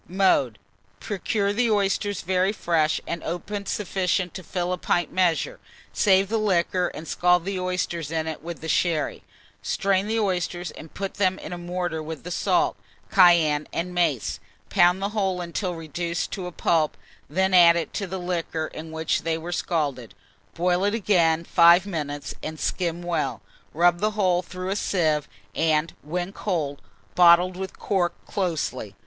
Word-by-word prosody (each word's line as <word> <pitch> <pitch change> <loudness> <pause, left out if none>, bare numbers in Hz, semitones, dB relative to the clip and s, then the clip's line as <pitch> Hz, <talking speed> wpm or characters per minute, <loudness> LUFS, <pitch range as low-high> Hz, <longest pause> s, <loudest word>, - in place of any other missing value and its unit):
Mode. 175 - +2 0.4
Procure 200 0 -1
the 235 +2 +1
oysters 205 -1 0
very 185 +2 +1
fresh, 165 -6 +1
and 170 -1 -4
open 200 +4 -4
sufficient 185 -2 -1
to 185 - -6
fill 180 0 -2
a - - -2
pint 175 -2 0
measure; 185 - +1 0.3
save 195 -1 +4
the 225 +2 0
liquor, 180 -3 +1
and 160 -1 -8
scald 180 -1 +2
the 195 -1 -2
oysters 180 -4 -2
in 160 -1 -1
it 160 -1 -5
with 170 +1 -7
the 160 - -6
sherry; 160 -1 0 0.4
strain 195 0 0
the 225 +1 0
oysters, 180 -3 -1
and 160 - -12
put 195 0 -4
them 190 -2 +1
in - - -7
a - - -5
mortar 175 -2 -3
with 160 +1 -7
the 180 - -7
salt, 355 - +1 0.3
cayenne, 170 -6 +5
and 180 +2 -3
mace; 175 -1 0 0.3
pound 180 0 +4
the 200 - 0
whole 195 -4 -1
until 175 +1 -3
reduced 170 +2 -3
to 185 -3 -4
a - - -6
pulp, 160 -2 +1 0.3
then 190 +5 +1
add 170 -2 +8
it 170 - -3
to 200 - -3
the 190 +1 -4
liquor 170 -3 -2
in 160 +1 -8
which 160 0 -1
they 165 -1 -1
were 165 +2 -6
scalded; 145 -9 -2 0.4
boil 180 +2 +1
it 205 +2 +1
again 170 -7 +2
five 170 +2 +6
minutes, 145 -6 -4
and 155 0 -6
skim 175 -1 -2
well; 175 -1 -1 0.3
rub 175 +2 +3
the 215 +3 +1
whole 180 -3 +3
through 185 +1 -6
a 195 - 0
sieve, 155 -8 0 0.3
and, 160 0 +1
when 175 +5 -4
cold, 155 -10 -2 0.3
bottle 175 +1 +6
and 190 +1 -5
cork 180 -4 0
closely. 155 - -3
175 Hz, 165 wpm, -24 LUFS, 165-190 Hz, 0.4 s, add